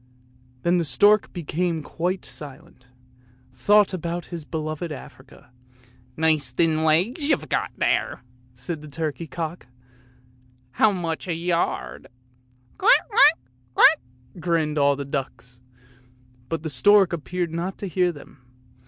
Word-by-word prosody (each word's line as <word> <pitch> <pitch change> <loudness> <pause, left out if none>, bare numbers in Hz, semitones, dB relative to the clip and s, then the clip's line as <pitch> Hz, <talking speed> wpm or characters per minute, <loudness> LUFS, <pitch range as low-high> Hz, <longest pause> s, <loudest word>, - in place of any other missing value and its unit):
Then 175 +1 +3
the - - +1
stork 205 +9 +3
became 170 -1 -2
quite 180 +5 -3
silent, 130 -3 -10
and 125 0 -31
thought 205 -1 +4
about 175 -1 -4
his 165 -3 -5
beloved 155 +1 -4
Africa. 130 -3 -12 0.3
" - - -26 0.3
Nice 155 -4 +2
thin 160 +4 +1
legs 195 - +1
you've - - +1
got! - - 0 0.5
" 125 - -31 0.3
said 150 +5 -5
the 150 - -10
turkey 155 0 -4
cock; 165 -3 -6 0.5
" 125 0 -33
how 220 - +6
much 170 -3 -4
a 170 - -1
yard? 165 - -2 0.3
" 125 0 -37
" 125 0 -34
Quack, 470 +6 +4
quack, 310 -6 +6 0.4
quack! - - +6 0.2
" 125 +7 -18
grinned 160 -3 0
all 140 0 +4
the 140 0 -5
ducks, 130 -3 -6 0.9
but 165 -1 -3
the 160 - -3
stork 200 +6 +4
appeared 170 +1 -3
not 175 +3 -3
to 200 - -5
hear 180 +1 +1
them. 145 -4 -15
160 Hz, 145 wpm, -24 LUFS, 130-175 Hz, 0.9 s, how